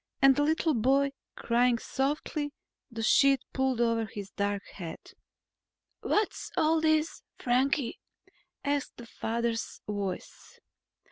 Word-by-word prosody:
And 270 -1 +7
the 290 - +2
little 315 +1 +2
boy 270 +4 +3 0.2
crying 240 +1 +2
softly, 290 +3 -2 0.4
the 225 -2 -5
sheet 275 +3 +5
pulled 265 -2 +1
over 230 -1 +2
his 200 -1 -8
dark 200 0 -2
head. 170 -4 -7 1.0
"What's 425 -1 -1
all 315 +1 +3
this, 315 0 +2 0.2
Frankie?" 255 +1 +1 0.6
asked 285 -1 -1
the 240 - -9
father's 230 0 -2
voice. 200 -3 -5
255 Hz, 115 wpm, -29 LUFS, 225-290 Hz, 1.0 s, And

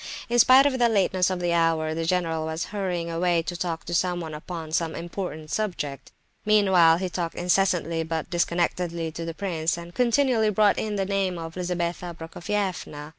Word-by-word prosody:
In 240 0 +2
spite 260 +3 +7
of 265 -3 +1
the 240 -1 +4
lateness 190 -4 +2
of 185 -1 -2
the 175 -1 0
hour, 165 -2 +1
the 165 +1 -2
general 165 -2 0
was 160 +2 -3
hurrying 180 -4 -2
away 170 0 +1
to 175 - -5
talk 165 -3 -3
to 175 - -5
someone 175 -2 -1
upon 160 +1 -7
some 165 0 -1
important 170 -3 -6
subject. 160 -10 -3 0.3
Meanwhile 190 -6 +5
he 185 +1 -2
talked 175 -2 -4
incessantly 175 -2 +1
but 160 -1 -4
disconnectedly 170 -1 -1
to 165 +1 -6
the 165 -1 -5
prince, 170 -4 -1
and 170 0 -9
continually 245 -1 +2
brought 210 0 +3
in 215 -1 -2
the 195 -1 0
name 195 -2 -1
of 165 -1 -6
Lizabetha 175 -1 -3
Prokofievna. 170 -3 -4
175 Hz, 175 wpm, -25 LUFS, 165-195 Hz, 0.3 s, spite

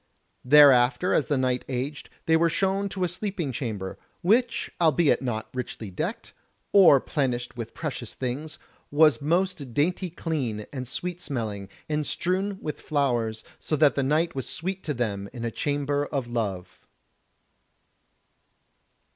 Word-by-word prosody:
Thereafter 140 +3 +6
as 145 - +3
the 145 +2 0
night 130 -1 0
aged, 135 +3 -4 0.2
they 160 - +4
were 165 +1 +4
shown 195 +4 0
to 190 -1 -3
a - - +2
sleeping 180 -4 -3
chamber, 110 -7 -4 0.2
which 235 +6 +2
albeit 160 -1 +4
not 115 -4 -3
richly 115 -5 -5
decked, 90 - -4 0.4
or 180 -9 +8
plenished 125 -4 -2
with 115 -1 -7
precious 135 -7 -5
things, 135 +5 -4 0.3
was 150 0 +4
most 160 -4 -1
dainty 180 +5 +1
clean, 135 -11 -3
and 130 -2 -5
sweet 180 +6 -4
smelling, 110 - -4 0.2
and 150 -1 -1
strewn 190 +3 -1
with 150 - -4
flowers, 120 -7 0 0.2
so 155 - -1
that 150 -1 +4
the 140 - 0
night 155 +5 +1
was 135 - -4
sweet 190 +3 -3
to 150 - -2
them 100 -4 -2
in 120 -1 -5
a 115 - -2
chamber 145 +2 -1
of 135 -4 -2
love. 100 -7 -4
145 Hz, 145 wpm, -26 LUFS, 120-165 Hz, 0.4 s, or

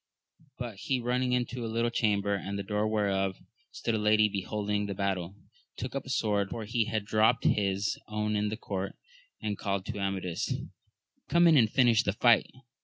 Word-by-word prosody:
But 120 -5 -6
he 130 +6 -1
running 125 +1 0
into 125 0 -1
a - - -2
little 115 +1 0
chamber, 100 -3 +1
at 100 0 -4
the 100 - -3
door 105 +2 0
whereof 95 -3 0 0.3
stood 115 - -3
a 110 - +1
lady 105 0 +4
beholding 105 +1 -2
the 100 - -4
battle, 95 -2 -2 0.4
took 125 - -5
up 135 -1 -4
a - - -8
sword, 105 -5 +1
for 110 0 -5
he 115 +1 0
had 110 -1 -2
dropt 110 +3 +3
his 100 0 +1
own 105 0 -1
in 105 0 +1
the 110 - -4
court, 100 -4 -4 0.5
and 105 -2 -2
called 100 -1 -2
to 105 - -5
Amadis, 95 -3 -2 0.8
Come 170 0 +5
in 165 -2 +7
and 115 -6 +5
finish 120 -2 +4
the 100 -3 -1
fight 115 +1 +4
105 Hz, 185 wpm, -29 LUFS, 100-115 Hz, 0.8 s, in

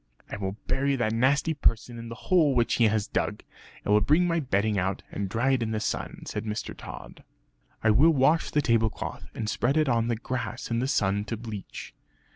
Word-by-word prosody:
"I - - -4
will 95 -1 -3
bury 140 +1 +1
that 110 -4 0
nasty 140 +7 +2
person 120 -4 0
in 115 0 -7
the 115 - -6
hole 155 -1 +2
which 120 -1 +2
he 120 - +5
has 110 -1 +2
dug. - - -2 0.4
I - - 0
will 105 0 +5
bring 150 - +3
my 170 -1 +1
bedding 105 -6 0
out, 95 +1 -2
and 100 -1 -3
dry 120 +6 +1
it 130 -2 +2
in 115 - -1
the 110 - 0
sun," 105 - -3
said 105 - -4
Mr. 105 0 -4
Tod. - - -10 0.6
"I 110 - +5
will 135 +10 +6
wash 155 +2 +3
the 150 - +1
tablecloth 115 -2 -1
and 110 - -3
spread 130 +6 +1
it 155 -1 +3
on 115 -2 +2
the 120 - +1
grass 120 +1 -4
in 115 - +1
the 130 - 0
sun 100 -7 +1
to 115 - -4
bleach. 110 -3 -8
115 Hz, 215 wpm, -27 LUFS, 110-135 Hz, 0.6 s, will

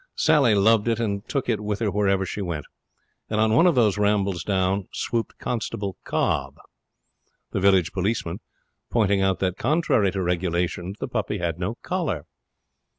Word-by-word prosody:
Sally 145 -8 +4
loved 110 +2 +4
it, 115 -1 +1
and 105 -1 -2
took 140 -3 -1
it 115 -3 +1
with 105 -1 -2
her 110 -3 0
wherever 100 -1 +1
she 100 - -4
went. 85 -6 -4 0.6
And 110 - 0
on 110 0 +3
one 165 +10 +5
of 175 - +3
these 105 -5 +3
rambles 100 -3 +1
down 95 -1 0
swooped 115 -1 -3
Constable 100 -5 -3
Cobb, - - 0 1.0
the - - -1
village 95 -3 +3
policeman, 95 -2 -2 0.5
pointing 100 -4 +2
out 95 -1 +2
that, 95 -2 0
contrary 135 - +2
to 95 -2 -1
regulations, 90 +1 -1
the - - -3
puppy - - -2
had 85 -1 -2
no 100 +6 -2
collar. 150 - -2
100 Hz, 160 wpm, -24 LUFS, 95-115 Hz, 1.0 s, one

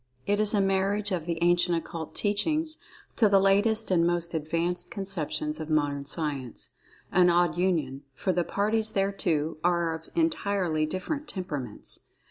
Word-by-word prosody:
It 205 +1 +1
is 215 0 +4
a 200 - +3
marriage 195 +2 +1
of 175 -3 -2
the 170 -1 -1
Ancient 175 0 +3
Occult 165 -1 -6
Teachings 310 +10 0 0.4
to 220 -4 +5
the 200 -1 +5
latest 205 +3 +2
and 170 -2 +4
most 170 0 0
advanced 165 +3 -1
conceptions 160 -8 -3
of 155 0 -6
Modern 145 -2 0
Science—an 150 +4 -1
odd 175 -2 +3
union, 160 -7 0
for 185 - -1
the 175 0 +1
parties 215 +4 0
thereto 175 -6 0
are 170 -1 +2
of 160 0 -9
entirely 200 - 0
different 280 - -4
temperaments. 145 - -5
175 Hz, 145 wpm, -27 LUFS, 160-200 Hz, 0.4 s, to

